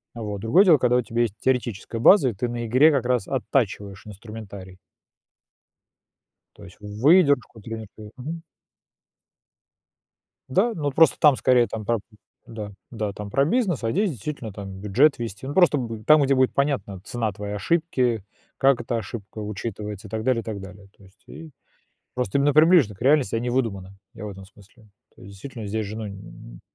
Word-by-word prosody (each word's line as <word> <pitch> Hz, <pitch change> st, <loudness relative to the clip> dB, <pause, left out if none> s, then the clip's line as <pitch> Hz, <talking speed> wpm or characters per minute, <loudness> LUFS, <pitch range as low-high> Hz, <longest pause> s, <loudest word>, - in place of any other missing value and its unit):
э, -, -, -8 dB
вот. 105 Hz, -2 st, -5 dB
Другое 115 Hz, -, +5 dB
дело, 170 Hz, -5 st, +6 dB
когда 125 Hz, -1 st, +2 dB
у 125 Hz, -, +3 dB
тебя 120 Hz, 0 st, -2 dB
есть 115 Hz, -4 st, -1 dB
теоретическая 120 Hz, -3 st, -2 dB
база, 140 Hz, -, +6 dB
и -, -, -4 dB
ты 105 Hz, +5 st, -3 dB
на 120 Hz, 0 st, -4 dB
игре 130 Hz, +7 st, +5 dB
как 135 Hz, -5 st, 0 dB
раз 125 Hz, -6 st, 0 dB
оттачиваешь 100 Hz, -2 st, -2 dB
инструментарий. 100 Hz, -3 st, -10 dB, 1.8 s
То 105 Hz, -, -15 dB
есть 95 Hz, -3 st, -14 dB
выдержку 125 Hz, -, +2 dB
трениру 110 Hz, -1 st, -9 dB
Мгм. 160 Hz, +6 st, -6 dB, 2.1 s
Да, 210 Hz, -, +2 dB
но 150 Hz, -7 st, -3 dB
от 140 Hz, -, -3 dB
просто 165 Hz, 0 st, +5 dB
там 150 Hz, -3 st, +6 dB
скорее 125 Hz, -2 st, +3 dB
там 110 Hz, -2 st, -6 dB
прап 115 Hz, -1 st, 0 dB, 0.4 s
Да. 105 Hz, -2 st, -7 dB, 0.2 s
Да, 110 Hz, -3 st, -3 dB
там 100 Hz, +1 st, -8 dB
про 135 Hz, +7 st, +2 dB
бизнес, 185 Hz, -, 0 dB
а 115 Hz, -, 0 dB
здесь 200 Hz, -, +1 dB
действительно 120 Hz, -3 st, -6 dB
там 95 Hz, -1 st, -8 dB
бюджет 120 Hz, +10 st, +3 dB
ввести. 115 Hz, +1 st, -6 dB
Ну, 140 Hz, -, -4 dB
просто 175 Hz, -3 st, +4 dB
будет 115 Hz, -4 st, -5 dB
там, 155 Hz, 0 st, +6 dB
где 140 Hz, -1 st, +3 dB
будет 130 Hz, -1 st, +2 dB
понятна 140 Hz, -9 st, -1 dB
цена 110 Hz, +1 st, -3 dB
твоей 105 Hz, +1 st, -6 dB
ошибки, 125 Hz, -, 0 dB, 0.3 s
как 135 Hz, -2 st, +3 dB
эта 120 Hz, 0 st, -2 dB
ошибка 110 Hz, 0 st, -7 dB
учитывается 105 Hz, 0 st, -6 dB
и -, -, -15 dB
так 110 Hz, +1 st, -4 dB
далее, 125 Hz, -1 st, +1 dB
и -, -, -15 dB
так 105 Hz, -3 st, -5 dB
далее. 100 Hz, +1 st, -12 dB
То -, -, -20 dB
есть 95 Hz, +2 st, -21 dB
и 160 Hz, -1 st, -11 dB, 0.6 s
просто 125 Hz, -1 st, -1 dB
именно 145 Hz, +1 st, +3 dB
приближено 155 Hz, -, +5 dB
к 95 Hz, -, -12 dB
реальности, 135 Hz, -2 st, +3 dB
а 115 Hz, -, 0 dB
не 120 Hz, +1 st, -2 dB
выдуманы, 100 Hz, -7 st, -2 dB, 0.2 s
я -, -, -9 dB
в -, -, -5 dB
этом 95 Hz, -1 st, -10 dB
смысле. 105 Hz, +2 st, -20 dB, 0.3 s
То 115 Hz, -, -18 dB
есть 100 Hz, -4 st, -11 dB
действительно, 115 Hz, +2 st, -8 dB
здесь 110 Hz, +1 st, -2 dB
же 105 Hz, +2 st, -7 dB
ну 110 Hz, -1 st, -5 dB
н 100 Hz, -, -7 dB
н -, -, -12 dB
115 Hz, 190 wpm, -24 LUFS, 105-135 Hz, 2.1 s, дело